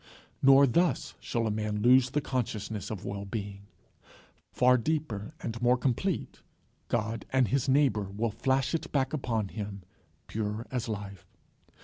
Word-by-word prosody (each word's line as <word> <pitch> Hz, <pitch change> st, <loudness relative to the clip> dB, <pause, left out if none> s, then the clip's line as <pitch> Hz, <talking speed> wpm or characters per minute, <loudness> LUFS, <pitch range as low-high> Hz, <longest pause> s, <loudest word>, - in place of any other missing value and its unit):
Nor 135 Hz, +1 st, +7 dB
thus 170 Hz, +7 st, +1 dB
shall 115 Hz, -1 st, -2 dB
a 110 Hz, -, 0 dB
man 105 Hz, 0 st, -2 dB
lose 130 Hz, +1 st, +6 dB
the 150 Hz, +3 st, 0 dB
consciousness 110 Hz, -6 st, -3 dB
of 105 Hz, -3 st, -6 dB
well 100 Hz, 0 st, -4 dB
being. 100 Hz, -1 st, -6 dB, 0.8 s
Far 125 Hz, 0 st, +5 dB
deeper 135 Hz, -2 st, -2 dB
and 115 Hz, 0 st, -5 dB
more 125 Hz, +1 st, +4 dB
complete, 135 Hz, +9 st, -1 dB, 0.5 s
God 110 Hz, +1 st, -1 dB
and 130 Hz, -2 st, +2 dB
his 135 Hz, -1 st, +1 dB
neighbour 130 Hz, -8 st, +3 dB
will 110 Hz, +3 st, -1 dB
flash 130 Hz, +5 st, 0 dB
it 165 Hz, -, -2 dB
back 135 Hz, -1 st, 0 dB
upon 115 Hz, -8 st, -1 dB
him 100 Hz, -2 st, -6 dB, 0.4 s
pure 110 Hz, +1 st, -3 dB
as 125 Hz, -3 st, -2 dB
life. 100 Hz, -3 st, -6 dB
115 Hz, 145 wpm, -29 LUFS, 105-130 Hz, 0.8 s, Nor